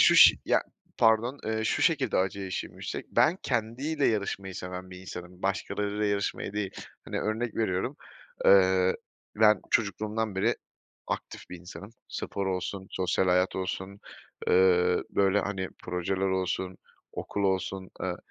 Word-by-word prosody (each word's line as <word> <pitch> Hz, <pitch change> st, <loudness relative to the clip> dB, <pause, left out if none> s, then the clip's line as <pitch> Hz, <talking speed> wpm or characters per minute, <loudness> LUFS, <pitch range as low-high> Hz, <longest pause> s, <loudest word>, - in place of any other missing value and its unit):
şu -, -, +7 dB
ş -, -, +9 dB
ya, -, -, +3 dB, 0.4 s
pardon, 115 Hz, +4 st, +3 dB
eee, 110 Hz, 0 st, -1 dB
şu -, -, +1 dB
şekilde 140 Hz, -, +2 dB
acı 95 Hz, +1 st, 0 dB
eşiğim 95 Hz, -1 st, -4 dB
yüksek. -, -, -5 dB
Ben 170 Hz, -, +4 dB
kendiyle 130 Hz, +6 st, 0 dB
yarışmayı 100 Hz, -3 st, -1 dB
seven 90 Hz, 0 st, -6 dB
bir 90 Hz, 0 st, -9 dB
insanım, 90 Hz, -1 st, -9 dB
başkalarıyla 100 Hz, +2 st, -1 dB
yarışmayı 100 Hz, -1 st, -1 dB
değil. 105 Hz, -2 st, -2 dB, 0.3 s
Hani, -, -, -3 dB
örnek 110 Hz, +2 st, -2 dB
veriyorum, 110 Hz, +5 st, 0 dB, 0.5 s
ııı, 95 Hz, -1 st, +6 dB, 0.4 s
ben 105 Hz, -2 st, +5 dB
çocukluğumdan 110 Hz, -1 st, 0 dB
beri 110 Hz, +5 st, +2 dB, 0.5 s
aktif -, -, -5 dB
bir 90 Hz, -, -7 dB
insanım. 90 Hz, +4 st, -10 dB, 0.2 s
Spor 100 Hz, -1 st, -3 dB
olsun, 95 Hz, +1 st, -3 dB
sosyal 95 Hz, 0 st, +1 dB
hayat 90 Hz, +1 st, +3 dB
olsun, 95 Hz, +1 st, -4 dB, 0.5 s
ııı, 90 Hz, -1 st, +4 dB
böyle, 100 Hz, +1 st, +3 dB
hani, 95 Hz, -2 st, -3 dB, 0.2 s
projeler 95 Hz, +2 st, -1 dB
olsun, 95 Hz, 0 st, -1 dB, 0.4 s
okul 100 Hz, -, -3 dB
olsun, 95 Hz, 0 st, -1 dB
aaa, 90 Hz, -1 st, -2 dB
95 Hz, 140 wpm, -28 LUFS, 95-110 Hz, 0.5 s, ş